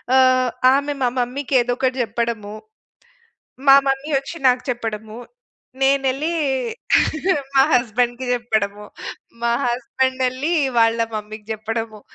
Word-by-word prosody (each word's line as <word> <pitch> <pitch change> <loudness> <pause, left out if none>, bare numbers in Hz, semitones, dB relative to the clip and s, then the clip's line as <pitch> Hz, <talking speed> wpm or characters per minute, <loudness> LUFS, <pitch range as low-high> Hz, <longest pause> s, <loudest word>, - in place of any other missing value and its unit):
ఆహ్, 255 -1 +4 0.2
ఆమె 285 +1 0
మా 245 - +3
మమ్మీకేదోకటి 255 0 0
జెప్పడము. 225 -2 -3 1.1
మా 275 - +10
మమ్మీ 270 +3 -1
ఒచ్చి 280 +5 -9
నాకు 250 0 +2
చెప్పడము, 220 -2 -5 0.6
నేనెళ్ళీ 275 +3 +1 1.2
మా 270 - +6
హస్బెండ్‌కి 245 +1 +1
జెప్పడము, 215 -4 -1 0.6
మా 235 0 +2
హస్బెండెళ్లి 260 +4 -1 0.3
వాళ్ళ 225 0 +3 0.2
మమ్మీ‌కి 215 0 -7
జెప్పడము. 220 0 -5
245 Hz, 95 wpm, -20 LUFS, 225-265 Hz, 1.2 s, మా